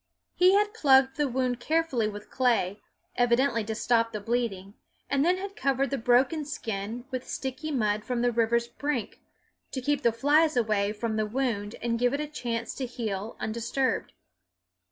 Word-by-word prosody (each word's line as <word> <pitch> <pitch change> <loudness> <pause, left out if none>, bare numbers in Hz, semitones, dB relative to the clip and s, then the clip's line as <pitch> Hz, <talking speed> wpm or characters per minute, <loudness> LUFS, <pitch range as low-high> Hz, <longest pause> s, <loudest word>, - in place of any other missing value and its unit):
He 365 +2 +5
had 415 +1 +2
plugged 270 -7 +4
the 295 -1 +2
wound 255 -1 -1
carefully 310 -6 +1
with 205 0 -8
clay, 230 -6 +1 0.3
evidently 245 0 +2
to 220 0 -3
stop 230 0 +2
the 210 - -3
bleeding, 205 -3 -2 0.4
and 275 0 +3
then 355 +3 +3
had 395 +1 -6
covered 275 0 0
the 275 - -1
broken 255 +7 +3
skin 230 -4 -5
with 255 -1 -4
sticky 265 +4 -4
mud 215 -7 0
from 245 0 -2
the 245 - +3
river's 235 0 +1
brink, 255 -1 -3 0.5
to 265 - -4
keep 290 +2 0
the 235 -3 +3
flies 290 +5 +3
away 210 -3 +1
from 220 +1 -3
the 215 -1 0
wound 225 -3 -2
and 230 -1 0
give 245 +2 +2
it - - -3
a 300 - -1
chance 235 -6 -4
to 260 - -2
heal 220 -3 -4
undisturbed. 235 +3 -1
245 Hz, 175 wpm, -28 LUFS, 225-275 Hz, 0.5 s, He